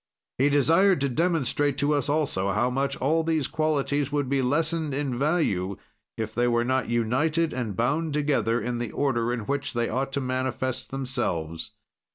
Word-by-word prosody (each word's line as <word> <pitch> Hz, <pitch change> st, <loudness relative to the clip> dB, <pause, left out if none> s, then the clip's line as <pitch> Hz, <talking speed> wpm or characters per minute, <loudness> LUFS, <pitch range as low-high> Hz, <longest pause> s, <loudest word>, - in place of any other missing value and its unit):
He 140 Hz, +2 st, +4 dB
desired 165 Hz, +7 st, +4 dB
to 140 Hz, -, +1 dB
demonstrate 145 Hz, -2 st, +1 dB
to 145 Hz, +2 st, +2 dB
us 145 Hz, 0 st, 0 dB
also 145 Hz, -11 st, 0 dB
how 110 Hz, +6 st, +1 dB
much 135 Hz, +1 st, -1 dB
all 160 Hz, +5 st, +1 dB
these 160 Hz, -4 st, 0 dB
qualities 145 Hz, -2 st, 0 dB
would 145 Hz, -3 st, -1 dB
be 140 Hz, -1 st, +2 dB
lessened 155 Hz, +2 st, 0 dB
in 140 Hz, -3 st, -1 dB
value 120 Hz, -, 0 dB, 0.4 s
if 110 Hz, -1 st, -3 dB
they 120 Hz, 0 st, +1 dB
were 120 Hz, 0 st, +2 dB
not 130 Hz, 0 st, 0 dB
united 150 Hz, +8 st, +1 dB
and 115 Hz, -6 st, -3 dB
bound 150 Hz, +6 st, 0 dB
together 125 Hz, -6 st, +1 dB
in 120 Hz, +1 st, -3 dB
the 120 Hz, -2 st, -3 dB
order 120 Hz, -4 st, 0 dB
in 120 Hz, -1 st, -2 dB
which 140 Hz, +6 st, -2 dB
they 120 Hz, -1 st, 0 dB
ought 135 Hz, +3 st, -1 dB
to 140 Hz, -, 0 dB
manifest 130 Hz, 0 st, -2 dB
themselves. 120 Hz, -, -3 dB
135 Hz, 175 wpm, -26 LUFS, 120-150 Hz, 0.4 s, He